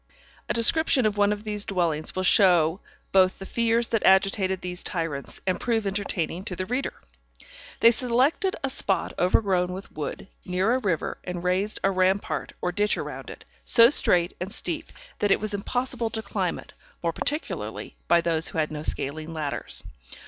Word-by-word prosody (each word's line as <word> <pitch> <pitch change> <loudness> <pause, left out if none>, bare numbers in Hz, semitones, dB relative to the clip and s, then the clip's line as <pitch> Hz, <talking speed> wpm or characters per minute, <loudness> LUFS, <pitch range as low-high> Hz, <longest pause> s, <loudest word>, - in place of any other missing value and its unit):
A - - +2
description 255 +2 +4
of 210 -1 +1
one 205 0 +3
of 210 0 -3
these 210 -1 -2
dwellings 170 -6 -1
will 185 - -1
both - - 0
show 175 -3 +4 0.3
the 190 -1 +5 0.2
fears 230 +2 +1
that 225 - +1
agitated 190 -1 +3
these 180 0 -3
tyrants, 165 -6 -3
and 185 -1 0
prove 225 -3 0
entertaining 190 -3 -2
to 180 - -3
the 185 - -3
reader. 250 +6 -2 0.9
They 230 - +8
selected 260 - +1
a 270 - 0
spot 195 -6 +1
overgrown 180 -1 +2
with 190 +2 -8
wood, 155 +5 -6 0.2
near 185 +5 +1
a 260 - +1
river, 185 -10 -2
and 180 -1 -5
raised 185 +4 0
a 195 - +3
rampart 190 +1 0
or 180 - 0
ditch 210 +3 +1
round - - -6
it, - - -11 0.2
so 235 +1 +7
straight 175 -10 +3
and 190 +2 -4
steep 320 +6 -3 0.3
that 205 - +1
it - - +4
was 215 0 -2
impossible 235 +3 -2
to 220 0 -3
climb 195 -4 -2
it, - - -13 0.3
more 165 -1 0
particularly 300 - -3
by 170 0 +4
those 165 -1 0
who - - -4
had 155 -1 0
no 150 -1 -5
scaling 155 +2 -2
ladders. 155 -3 -4
195 Hz, 180 wpm, -25 LUFS, 180-225 Hz, 0.9 s, They